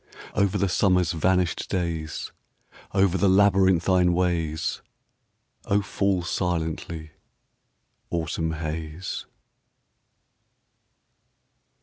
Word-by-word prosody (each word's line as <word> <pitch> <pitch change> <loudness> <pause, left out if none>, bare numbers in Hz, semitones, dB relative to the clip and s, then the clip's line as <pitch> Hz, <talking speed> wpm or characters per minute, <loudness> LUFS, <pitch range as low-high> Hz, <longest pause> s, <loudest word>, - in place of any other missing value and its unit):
Over 100 -1 +1
the 100 - +1
summer's 90 -2 +2
vanished 90 +2 +1
days. 85 -4 -3 0.6
Over 95 -1 +2
the 100 - +4
labyrinthine 95 -2 +4
ways, 85 -3 -1 0.8
O, 100 0 +2
fall 95 -2 0
silently, 80 -3 -3 1.0
autumn 80 -1 -2
haze 80 +2 -5
90 Hz, 70 wpm, -25 LUFS, 80-95 Hz, 1.0 s, the